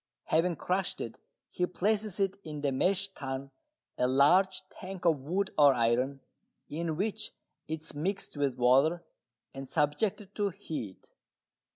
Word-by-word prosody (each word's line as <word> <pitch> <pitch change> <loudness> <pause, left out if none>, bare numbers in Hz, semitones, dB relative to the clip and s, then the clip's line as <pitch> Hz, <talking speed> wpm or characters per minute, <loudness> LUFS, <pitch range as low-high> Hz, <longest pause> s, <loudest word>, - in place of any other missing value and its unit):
Having 170 +2 +2
crushed 185 +4 -1
it, 115 - -6 0.3
he 180 - 0
places 210 +2 0
it 195 0 0
in 150 -2 -6
the 140 -1 +1
"mash 195 +8 +1
tun," 135 -5 -5 0.5
a 125 - +3
large 180 +9 +4
tank 185 -1 -8
of 160 -4 +4
wood 185 +8 -1
or 140 -2 +7
iron, 125 +4 +1 0.5
in 160 +1 -2
which 215 +3 -2 0.4
it 160 0 -3
is - - -7
mixed 180 +7 -3
with 140 -3 0
water 135 +8 +4 0.5
and 135 -1 -7
subjected 185 +7 0
to 205 -1 0
heat. 155 - -7
160 Hz, 145 wpm, -31 LUFS, 140-190 Hz, 0.5 s, or